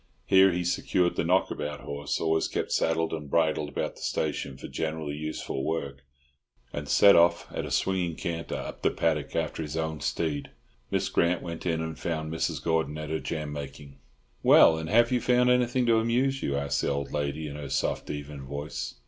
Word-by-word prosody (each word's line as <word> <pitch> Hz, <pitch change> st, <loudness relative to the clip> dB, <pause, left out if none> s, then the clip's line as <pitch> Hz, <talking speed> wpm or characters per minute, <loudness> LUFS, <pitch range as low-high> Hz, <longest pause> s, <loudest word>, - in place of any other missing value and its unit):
Here 95 Hz, 0 st, +6 dB
he 90 Hz, 0 st, -1 dB
secured 90 Hz, 0 st, +1 dB
the -, -, 0 dB
"knockabout" 75 Hz, 0 st, 0 dB
horse, 70 Hz, 0 st, -3 dB
always 80 Hz, 0 st, +1 dB
kept -, -, -3 dB
saddled 80 Hz, 0 st, +1 dB
and 75 Hz, -3 st, -5 dB
bridled 80 Hz, -1 st, +1 dB
about 70 Hz, -, -3 dB
the -, -, -13 dB
station 65 Hz, -, -2 dB
for -, -, -8 dB
generally 80 Hz, -2 st, -3 dB
useful 75 Hz, -3 st, -4 dB
work, 70 Hz, -3 st, -3 dB, 0.7 s
and 75 Hz, 0 st, -5 dB
set 100 Hz, -1 st, +7 dB
off 85 Hz, +1 st, +4 dB
at -, -, -3 dB
a -, -, -6 dB
swinging 90 Hz, -3 st, 0 dB
canter 85 Hz, 0 st, -4 dB
up -, -, -6 dB
the -, -, +3 dB
paddock 75 Hz, -4 st, -1 dB
after -, -, -1 dB
his 75 Hz, 0 st, -4 dB
own 80 Hz, -1 st, -2 dB
steed. 75 Hz, -4 st, -2 dB, 0.4 s
Miss 95 Hz, 0 st, 0 dB
Grant 90 Hz, -2 st, +1 dB
went 85 Hz, 0 st, -5 dB
in 80 Hz, -1 st, 0 dB
and 80 Hz, -3 st, -6 dB
found 80 Hz, +1 st, -3 dB
Mrs. 80 Hz, -, -2 dB
Gordon 80 Hz, -3 st, 0 dB
at 75 Hz, 0 st, -5 dB
her 80 Hz, -, 0 dB
jam 75 Hz, -3 st, -4 dB
making. 70 Hz, -1 st, -8 dB, 0.4 s
"Well, 80 Hz, -, +7 dB
and 80 Hz, 0 st, -5 dB
have 120 Hz, +4 st, +4 dB
you 125 Hz, -1 st, +2 dB
found 125 Hz, +1 st, +4 dB
anything 125 Hz, 0 st, +2 dB
to 115 Hz, -1 st, +4 dB
amuse 130 Hz, +4 st, +1 dB
you?" 70 Hz, 0 st, -1 dB
asked 70 Hz, 0 st, 0 dB
the -, -, 0 dB
old 70 Hz, 0 st, -2 dB
lady 75 Hz, +1 st, -2 dB
in 70 Hz, -, -7 dB
her 75 Hz, -2 st, -6 dB
soft, -, -, -1 dB
even 75 Hz, -1 st, -6 dB
voice. 70 Hz, +1 st, -5 dB
80 Hz, 195 wpm, -28 LUFS, 75-85 Hz, 0.7 s, set